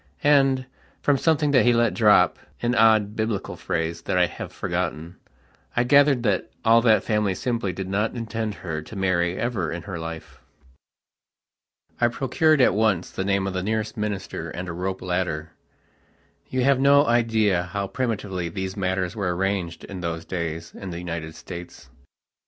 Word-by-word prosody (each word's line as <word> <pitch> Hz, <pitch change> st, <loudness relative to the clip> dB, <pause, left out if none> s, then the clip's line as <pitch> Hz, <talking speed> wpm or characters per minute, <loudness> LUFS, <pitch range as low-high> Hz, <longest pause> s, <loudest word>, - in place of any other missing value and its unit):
And, 135 Hz, -3 st, +4 dB, 0.4 s
from 145 Hz, -, +4 dB
something 155 Hz, -3 st, +2 dB
that 130 Hz, -3 st, +5 dB
he 120 Hz, -, +4 dB
let 120 Hz, -2 st, +2 dB
dropan 105 Hz, +2 st, +2 dB
odd 110 Hz, -2 st, +4 dB
Biblical 110 Hz, -2 st, -2 dB
phrase 85 Hz, 0 st, -3 dB
that 90 Hz, -, -1 dB
I 90 Hz, -, +5 dB
have -, -, -7 dB
forgottenI 85 Hz, -1 st, -3 dB, 0.7 s
gathered 140 Hz, -1 st, +5 dB
that 100 Hz, -5 st, 0 dB, 0.2 s
all 115 Hz, +1 st, +6 dB
that 110 Hz, -2 st, +4 dB
family 105 Hz, -3 st, 0 dB
simply 115 Hz, -3 st, -1 dB
did 95 Hz, +1 st, -5 dB
not 105 Hz, +5 st, -1 dB
intend 110 Hz, -2 st, -3 dB
her 80 Hz, -2 st, -3 dB
to 80 Hz, -, -11 dB
marry 90 Hz, -2 st, +1 dB
ever 110 Hz, -9 st, -1 dB
in 85 Hz, 0 st, -5 dB
her 95 Hz, -5 st, -6 dB
life. 80 Hz, 0 st, -8 dB, 1.6 s
I 120 Hz, -, +4 dB
procured 135 Hz, +5 st, +2 dB
at 125 Hz, -, +5 dB
once 105 Hz, -4 st, +1 dB
the 95 Hz, -, -3 dB
name 100 Hz, 0 st, +1 dB
of 95 Hz, -, -3 dB
the 95 Hz, -, -1 dB
nearest 110 Hz, +2 st, -2 dB
minister 105 Hz, -3 st, -4 dB
and 90 Hz, +2 st, -6 dB
a 85 Hz, -, -4 dB
rope 95 Hz, +2 st, -3 dB
ladderyou 90 Hz, -3 st, -2 dB, 1.1 s
have 135 Hz, 0 st, +4 dB
no 140 Hz, +1 st, +5 dB
idea 115 Hz, -5 st, +2 dB
how 100 Hz, +3 st, -3 dB
primitively 100 Hz, -7 st, -3 dB
these 95 Hz, +2 st, -4 dB
matters 95 Hz, -2 st, -1 dB
were 95 Hz, -5 st, -1 dB
arranged 95 Hz, -3 st, -2 dB
in 95 Hz, -2 st, -7 dB
those 85 Hz, -1 st, -4 dB
days 85 Hz, -2 st, -4 dB
in 95 Hz, -, -8 dB
the 85 Hz, -, -5 dB
United 80 Hz, -2 st, -5 dB
States. 90 Hz, -1 st, -10 dB
100 Hz, 160 wpm, -24 LUFS, 90-115 Hz, 1.6 s, all